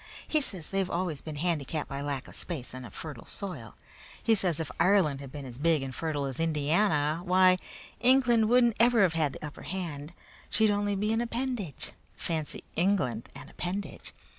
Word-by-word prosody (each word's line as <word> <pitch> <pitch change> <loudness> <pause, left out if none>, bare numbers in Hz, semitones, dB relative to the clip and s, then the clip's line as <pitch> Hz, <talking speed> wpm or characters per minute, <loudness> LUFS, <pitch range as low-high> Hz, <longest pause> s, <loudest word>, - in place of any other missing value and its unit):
He 310 - +2
says 185 - -1
they've 195 -1 0
always 170 -5 -2
been 155 -2 -6
handicapped 155 -2 -1
by 140 0 -4
lack 140 -2 -3
of - - -12
space 155 -8 -5
and 130 -1 -6
of 100 - -15
fertile 145 -7 -7
soil. 155 - -6 0.5
He 225 - +4
says 180 -7 +2
if 155 -6 -3
Ireland 175 -8 +4
had 135 -2 -9
been 145 -1 -7
as 125 -1 -8
big 160 -2 +3
and 135 -1 -5
fertile 150 -2 -2
as 135 0 -4
Indiana, 155 0 +2
why, 185 0 +5 0.4
England 240 -2 +4
wouldn't 240 -2 +5
ever 235 -2 +6
have 180 -4 +3
had 155 -4 +1
the - - -7
upper 150 - -8
hand. 170 -4 -5 0.4
She'd 220 -1 +3
only 205 0 +1
be 210 +3 +1
an 225 - +2
appendage. 235 - -2 0.3
Fancy 160 -3 -2
England 170 - +1
an - - -9
appendage! 190 +3 -4
170 Hz, 185 wpm, -29 LUFS, 145-205 Hz, 0.5 s, ever